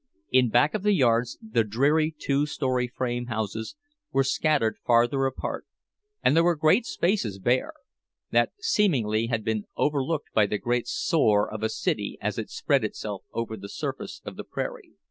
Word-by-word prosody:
In 125 -2 +4
back 120 +7 +3
of 215 - -1
the 210 +1 +3
yards 120 -5 +2
the 115 - +2
dreary 150 +9 +1
two 140 +1 0
story 130 -4 -1
frame 120 0 -3
houses 110 - -3 0.4
were 135 - +3
scattered 140 -4 +1
farther 120 +3 +3
apart, 130 - -5 0.6
and - - +4
there 165 - +5
were 175 0 +3
great 160 +10 +3
spaces 170 - 0
bare—that 130 - -2
seemingly 130 - +1
had 115 -2 -1
been 110 -1 -1
overlooked 145 +1 0
by 105 -2 +4
the 105 - -1
great 120 +3 -1
sore 110 - +2
of 110 - -6
a 110 - 0
city - - -2
as - - -2
it - - -5
spread - - +1
itself - - -5
over 115 -1 -3
the 100 -1 -9
surface 145 - -5
of - - -7
the - - -5
prairie. - - -6
130 Hz, 165 wpm, -26 LUFS, 110-155 Hz, 0.6 s, there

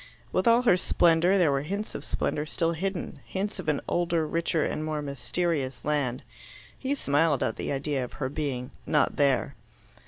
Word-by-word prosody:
With 185 - +1
all 235 +1 +6
her 230 -7 +5
splendour, 175 +1 +3
there 170 -6 +4
were 135 0 +1
hints 200 +8 -4
of - - -6
splendour 150 +1 -1
still 165 +1 0
hidden 180 -2 -3
hints 200 +1 -3
of 165 -4 -2
an 150 - +1
older, 170 -2 +1
richer, 165 0 0
and 155 - -2
more 155 -1 -2
mysterious 140 -2 -2
land. 140 -4 0 0.5
He 275 +2 -2
smiled 145 - +2
at 110 - -1
the - - -3
idea 140 -1 -1
of 125 - -7
her 135 - -2
being 135 -3 -3 0.2
"not 150 - +2
there." 140 -1 +2
155 Hz, 180 wpm, -27 LUFS, 140-175 Hz, 0.5 s, all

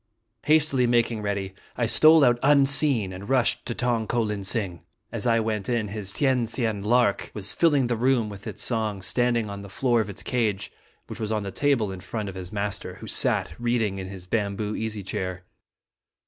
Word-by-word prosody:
Hastily 150 -4 +3
making 120 -2 +1
ready, 100 -2 -3 0.2
I 120 - +1
stole 155 +6 +6
out 120 -1 +3
unseen, 140 -7 +3
and 95 +4 -9
rushed 130 -2 +1
to 120 - -3
Tong 120 -3 0
ko 120 -1 +1
lin 105 -2 -3
sing. 95 -4 -2 0.3
As - - -3
I 115 -1 +4
went 110 -2 -2
in, 115 -4 0
his 100 -2 -5
Tien 130 -3 +1
Sien 115 -3 -2
lark 120 -1 +2
was 100 -2 0
filling 145 -6 +3
the 120 0 0
room 120 -1 +2
with 100 -1 -9
its - - -5
song, 110 -5 -2
standing 120 +2 +1
on 100 0 -6
the 100 - -10
floor 120 +2 +1
of 105 - -4
its 100 - -7
cage, 110 -6 -1 0.3
which - - -9
was 110 -1 -3
on 105 -2 -1
the 100 - -5
table 120 -3 +1
in 95 - -7
front 105 +2 -5
of - - -7
his 90 -1 -8
master, 100 -1 -3
who - - -10
sat - - 0
reading 115 -5 0
in 95 - -5
his 95 -2 -9
bamboo 105 +1 -2
easy 110 -2 -4
chair. 90 -1 -4
110 Hz, 200 wpm, -25 LUFS, 100-120 Hz, 0.3 s, stole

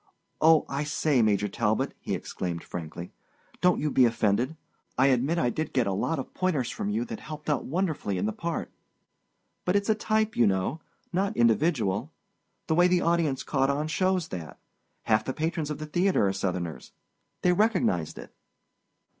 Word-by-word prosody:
Oh, 160 0 +6
I 140 +2 -2
say, 150 -3 +1
Major 105 -2 +2
Talbot," 110 +1 0
he - - -2
exclaimed 85 -2 -4
frankly, 85 +1 -7 0.5
"don't 180 -1 +4
you 150 0 -1
be 130 - +5
offended. 115 +6 +1 0.4
I 135 +2 +5
admit 135 +6 +2
I 125 -7 +2
did 155 +3 -3
get 125 -3 +2
a 100 - 0
lot 160 +12 -1
of 135 - -6
pointers 160 -10 0
from 205 -2 -3
you 220 +4 -1
that 230 -2 -6
helped 150 0 -5
out 145 - -1
wonderfully 155 - -1
in 90 - -1
the 110 - -1
part. 170 +5 -4 0.9
But 180 - +1
it's 200 +1 +1
a - - +6
type, 215 0 0
you 120 - +4
know—not 160 - -2
individual. 120 - +2 0.5
The 160 - 0
way 175 +2 +5
the 180 -1 +2
audience 165 -6 +1
caught 135 -2 +1
on 145 +2 0
shows 185 +1 0
that. 85 -4 -7 0.5
Half 110 -1 +2
the 130 - -2
patrons 160 0 -2
of 150 - -3
that 155 0 -8
theater 180 - +3
are 95 - 0
Southerners. 90 -7 -4 0.5
They 180 - +4
recognized 180 - +1
it." - - -10
150 Hz, 175 wpm, -27 LUFS, 110-175 Hz, 0.9 s, Oh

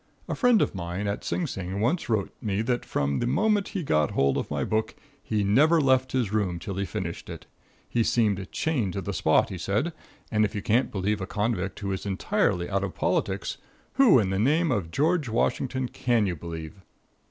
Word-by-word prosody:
A - - -2
friend 245 -5 +4
of - - -2
mine 90 +2 -4
at 100 0 -2
Sing 180 - -1
Sing 95 - -4
once 140 - 0
wrote 105 -4 0
me 105 0 -1
that 120 +1 -1
from 70 0 0
the 120 - 0
moment 210 - +2
he 180 - -2
got 75 - +2
hold 70 -1 +3
of - - -2
my - - -1
book, 110 0 -1 0.3
he 105 -2 -1
never 145 +12 +4
left 130 -2 +3
his 120 -6 0
room 100 -5 0
till 100 +4 -5
he 100 - 0
finished 85 -3 -5
it. - - -8 0.4
He 120 - +1
seemed 105 -5 +1
chained 125 - -1
to 100 - -3
the 100 +2 -4
spot, 80 -2 +3
he 95 - -6
said, 105 - -1 0.4
and 110 -1 +3
if 105 - -1
you 100 - -2
can't 120 +4 +2
believe 100 +1 -1
a 95 - -3
convict, 105 -2 -2
who 100 -1 -2
is 95 +1 -4
entirely 95 -2 0
out 100 0 -1
of 95 - -4
politics, - - -1 0.3
who 255 - +6
in 100 -5 +1
the 95 - 0
name 155 +7 +2
of 100 -9 -1
George 150 - +1
Washington 130 +3 0
can 120 -3 +1
you 90 -3 -1
believe? 80 +3 -8
105 Hz, 210 wpm, -26 LUFS, 95-130 Hz, 0.4 s, who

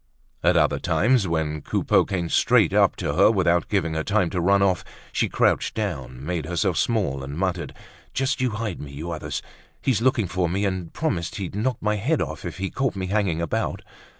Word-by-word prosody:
At - - +4
other - - +3
times, 120 -3 +2
when 80 -2 -1
Coupeau - - +2
came 90 -4 -2
straight - - +3
up - - +4
to - - -2
her - - +5
without 90 -5 +2
giving 85 -6 0
her 80 0 -1
time 100 -3 +1
to 90 - -1
run 100 +3 +4
off, 95 -2 +2 0.3
she - - +1
crouched - - +1
down, 70 - -4
made 85 -3 -2
herself 90 0 0
small 90 - 0
and 70 +2 -6
muttered: 90 -1 -1 0.4
"Just 135 +1 -1
you 130 - +2
hide 110 -4 -4
me, 70 - -8
you 80 +5 -5
others. 75 -3 -4 0.4
He's 125 -6 +1
looking 120 -3 +2
for 90 -1 -1
me, 100 +4 0
and 95 -2 -1
he - - -13
promised 85 +1 -2
he'd 95 -4 -4
knock 115 +4 -1
my 105 0 +1
head 140 +10 +1
off 80 - -4
if 85 - -5
he 95 0 -3
caught 135 -5 -1
me 95 -1 -3
hanging 95 -6 +1
about." 85 - -2
95 Hz, 205 wpm, -24 LUFS, 80-105 Hz, 0.4 s, her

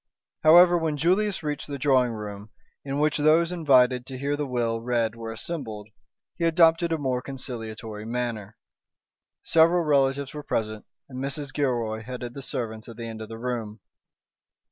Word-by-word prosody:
However, 175 +2 +7
when 160 -2 -1
Julius 185 +5 +1
reached 150 -1 -3
the 140 -1 -5
drawing 130 -3 +3
room, 105 -1 -7 0.3
in 140 0 -3
which 150 +1 +2
those 160 +3 +4
invited 130 -7 +3
to 130 - -6
hear 140 +2 -1
the 145 -1 -3
will 115 -3 -1
read 115 -2 0
were 115 -1 -6
assembled, 110 -5 -6 0.5
he 170 - -3
adopted 165 0 +4
a 165 - +1
more 130 -4 -1
conciliatory 115 -5 -7
manner. 115 -3 -4 0.9
Several 170 +2 +4
relatives 140 -2 +1
were 150 - -6
present, 110 -5 -3 0.2
and 130 -2 -8
Mrs. 140 0 -4
Gilroy 120 -6 -1
headed 125 +1 -7
the 140 - -7
servants 115 -3 -5
at 115 - -11
the 115 - -6
end 110 -1 -7
of 110 - -7
the 115 - -7
room. 115 -3 -4
130 Hz, 165 wpm, -26 LUFS, 115-150 Hz, 0.9 s, However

